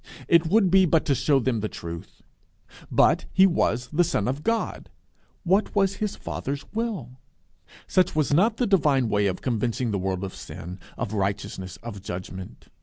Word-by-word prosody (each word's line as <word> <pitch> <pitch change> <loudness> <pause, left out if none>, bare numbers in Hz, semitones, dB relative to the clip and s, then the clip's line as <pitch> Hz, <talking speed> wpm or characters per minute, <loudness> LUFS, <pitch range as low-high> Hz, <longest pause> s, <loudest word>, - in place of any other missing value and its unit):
It 170 -1 +4
would 195 0 +3
be 190 0 +6
but 165 0 +2
to 140 - +2
shew 140 +1 +2
them 120 -2 0
the 105 0 -2
truth. 85 0 -9 0.7
But - - +3
he 190 - +6
was 125 -9 +1
the 175 +4 +4
Son 135 -11 0
of 135 +3 -2
God: 230 +6 -2 0.5
what 195 +4 +1
was 195 -1 +2
his 210 -1 -2
Father's 140 +1 -5
will? 200 - -4 0.7
Such 185 -4 +2
was 150 -2 +1
not 215 +8 +3
the 250 - +1
divine 145 - +3
way 100 -1 +2
of 95 - -3
convincing 120 0 -1
the 100 - -1
world 95 0 -2
of 95 - -5
sin, 90 +3 -8 0.2
of 115 -3 -3
righteousness, 95 -2 -3
of 110 -4 -7
judgment. 95 0 -8
130 Hz, 175 wpm, -25 LUFS, -, 0.7 s, be